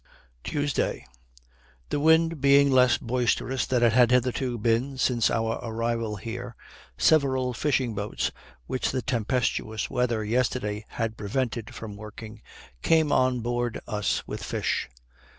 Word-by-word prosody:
Tuesday. 145 -1 -1 0.8
The - - -1
wind 160 0 +3
being 140 0 +5
less 125 -1 +5
boisterous 125 +1 -1
than 125 -2 +1
it 115 -2 +4
had 120 -1 +5
hitherto 125 0 +1
been 115 +5 0
since 120 -4 +2
our 115 0 -1
arrival 115 -1 -2
here, 115 +3 -6 0.4
several 130 -5 +3
fishing 130 -2 0
boats, 105 0 -2 0.3
which 130 - -1
the 130 -2 -2
tempestuous 115 -2 -1
weather 120 -3 0
yesterday 110 -2 -1
had 115 -1 -3
prevented 115 +1 -3
from 105 -3 -8
working, 110 +1 -10 0.4
came 160 -2 +3
on 130 -1 +2
board 120 0 -2
us 105 -1 -1
with - - -6
fish. - - -2
120 Hz, 130 wpm, -26 LUFS, 115-130 Hz, 0.8 s, being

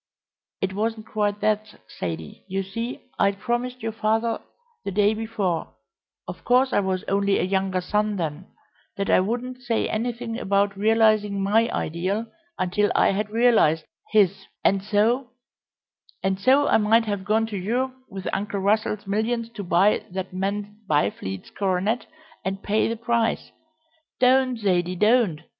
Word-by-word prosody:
"It 190 0 -1
wasn't 220 +2 -2
quite 205 -1 -1
that, 215 0 -1 0.2
Zaidie. 80 -3 -5
You 195 0 -2
see, 230 +6 -6
I'd 200 0 +3
promised 245 +3 -2
your 225 - -1
father 225 +1 0 0.4
the - - -3
day 205 +2 +3
before 215 -6 -2 0.5
of - - -8
course 255 +2 +3
I - - +4
was 190 -2 -1
only 200 0 +1
a - - +1
younger 190 0 0
son 210 +3 0
then 165 0 -4 0.5
that 200 - 0
I - - +6
wouldn't 245 +6 -2
say 240 -2 0
anything 235 +1 -3
about 200 -1 +1
realising 215 -1 +3
my 215 +4 +3
ideal 185 +7 -2 0.3
until 195 +3 +1
I - - +4
had 205 +2 -2
realised 215 -9 +3 0.3
his, 195 -2 +3 0.2
and 195 -1 +3
so 220 +6 +1 0.5
" - - -35
"And 190 0 0
so 270 +7 +4
I - - +5
might 225 +2 +3
have 205 -3 -2
gone 215 +2 +2
to 220 -2 -6
Europe 240 +7 -1 0.2
with 190 -1 -6
Uncle 200 0 -2
Russell's 210 +1 +1
millions 225 +3 -1
to 205 - -6
buy 185 +3 +3
that 190 0 -5
man 200 +2 -3
Byfleet's 100 -9 -1
coronet, 200 +4 0 0.4
and 195 +1 -3
pay 210 +1 +2
the 230 - -1
price 230 0 0 0.3
" 320 0 -43
"Don't, 255 0 +4
Zaidie, 180 -4 0
don't! 210 -6 +3
210 Hz, 155 wpm, -24 LUFS, 195-230 Hz, 0.5 s, I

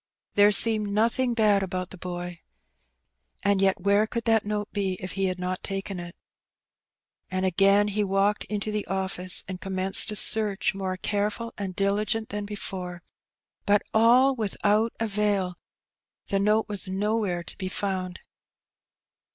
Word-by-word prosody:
There 205 0 +5
seemed 215 0 +4
nothing 235 +4 +1
bad 210 -3 +3
about 185 -1 -4
the 190 - -9
boy. 175 -1 -6 1.0
And 200 -1 +2
yet 195 -1 +2
where 200 +3 +2
could 235 +1 -4
that 225 -1 +3
note 210 0 -3
be 195 -2 -1
if 185 - -5
he 195 0 -1
had 185 -1 -1
not 185 0 -3
taken 195 -1 -5
it? 175 0 -8 1.1
And 185 0 -1
again 195 +3 +3
he 210 +1 0
walked 200 +1 +1
back - - -37
into 210 0 -3
the 210 -1 -3
office^ 190 -1 0
and 185 -1 -7
com 195 -1 -5
menced 190 +3 +4
a 210 - -1
search 210 -1 +2
more 190 -1 -4
careful 210 +4 -2
and 190 -3 -5
diligent 210 +3 0
than 205 0 -4
before, 185 -3 -5 0.6
but 205 0 +3
all 245 +5 +5
without 215 0 0
avail; 205 -4 0 0.8
the 195 - +1
note 210 +2 +2
was 205 -1 -3
nowhere 195 -2 -1
to - - -5
be 185 -1 -3
found. 185 -2 -3
200 Hz, 155 wpm, -26 LUFS, 185-210 Hz, 1.1 s, There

